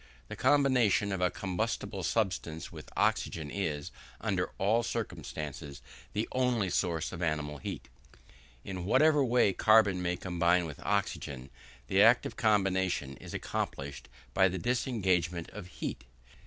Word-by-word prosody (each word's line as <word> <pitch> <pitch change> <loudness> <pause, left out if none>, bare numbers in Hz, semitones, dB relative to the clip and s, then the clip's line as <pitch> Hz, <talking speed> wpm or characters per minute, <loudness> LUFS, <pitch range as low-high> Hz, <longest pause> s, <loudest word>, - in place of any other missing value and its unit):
The - - -5
combination 130 -7 +3
of 95 -1 -2
a 90 - +3
combustible 100 +2 -3
substance 90 -4 -1
with - - -10
oxygen 75 -3 0
is, 75 -7 -3 0.3
under - - -1
all 110 +5 +2
circumstances, 75 - -5 0.3
the 105 +2 -1
only 125 -7 +1
source 85 -2 0
of 85 - -7
animal 75 -3 -1
heat. - - -6 0.8
In 90 -2 -5
whatever 145 +7 +4
way 120 -5 +3
carbon 105 -4 +4
may 90 0 -1
combine 90 -1 +2
with 75 -3 -8
oxygen, 70 -10 -2 0.3
the 95 +10 +3
act 115 +3 +6
of - - -5
combination 95 - +1
is - - -9
accompanied 70 -2 -4 0.2
by 95 +5 +5
the 95 0 -3
disengagement 90 -7 0
of 100 -3 -8
heat. 65 -7 -6
95 Hz, 135 wpm, -31 LUFS, 85-110 Hz, 0.8 s, act